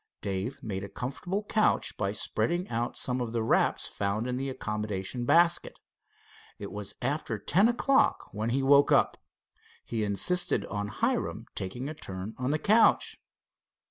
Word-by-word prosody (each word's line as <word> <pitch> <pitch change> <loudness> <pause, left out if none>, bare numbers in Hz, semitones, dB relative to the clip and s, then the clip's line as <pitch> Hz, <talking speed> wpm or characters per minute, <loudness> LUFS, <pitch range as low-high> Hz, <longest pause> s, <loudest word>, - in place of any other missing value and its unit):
Dave 100 +6 -3
made 95 -3 -4
a 100 - -6
comfortable 160 - -4
couch 215 +1 +1
by 100 -1 -1
spreading 170 - -1
out 120 +1 -2
some 125 0 +1
of 115 -2 -4
the 115 -1 0
wraps - - +2
found 100 +3 -2
in 125 0 -2
the 135 +2 -2
accommodation 105 -1 -3
basket. 170 +5 +3 0.8
It 100 - -7
was 105 -1 -3
after 135 -4 -1
ten 180 - +3
o'clock 265 +3 +2
when 110 +2 -2
he 135 +3 0
woke 140 +1 +5
up. - - +4 0.7
He 115 -2 -2
insisted 105 - +1
on 105 +1 -3
Hiram 105 - -1
taking 120 +8 -4
a 155 - -4
turn 95 -6 -6
on 130 0 -1
the 150 - +1
couch. 215 +7 +3
120 Hz, 155 wpm, -29 LUFS, 105-150 Hz, 0.8 s, woke